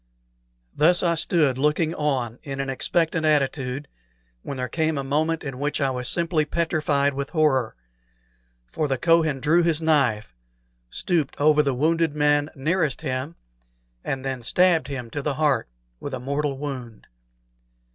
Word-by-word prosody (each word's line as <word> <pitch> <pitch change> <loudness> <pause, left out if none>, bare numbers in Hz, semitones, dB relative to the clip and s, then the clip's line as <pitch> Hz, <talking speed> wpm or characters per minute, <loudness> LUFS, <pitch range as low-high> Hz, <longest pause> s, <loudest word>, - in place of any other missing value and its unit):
Thus 175 +4 +4
I 170 -1 +3
stood 155 -5 +1
looking 150 +3 +1
on 130 -7 -2
in 135 -1 -6
an 135 -1 -2
expectant 165 +4 0
attitude, 140 -2 0 0.5
when 140 - -6
there 125 0 -2
came 160 +3 -1
a 140 - -2
moment 155 +4 0
in 135 -3 -6
which 145 +1 -1
I 135 -2 +1
was 125 -1 -2
simply 170 -2 +1
petrified 150 -3 0
with 140 0 -4
horror; 145 -8 +1 0.9
for 150 - -2
the 135 -2 -1
Kohen 160 -1 +2
drew 160 +5 +3
his 165 -2 +1
knife, 135 - +1 0.6
stooped 160 - -1
over 150 +1 +5
the 140 -3 0
wounded 160 +2 +1
man 145 0 +2
nearest 155 +1 0
him, 135 +2 -3 0.7
and 135 0 -3
then 130 -2 -3
stabbed 170 +5 +3
him 125 -5 -6
to 145 - -3
the 140 0 -2
heart 150 - +1 0.3
with 140 - -5
a - - -6
mortal 140 +2 -2
wound. 130 -6 -7
145 Hz, 155 wpm, -24 LUFS, 135-160 Hz, 0.9 s, over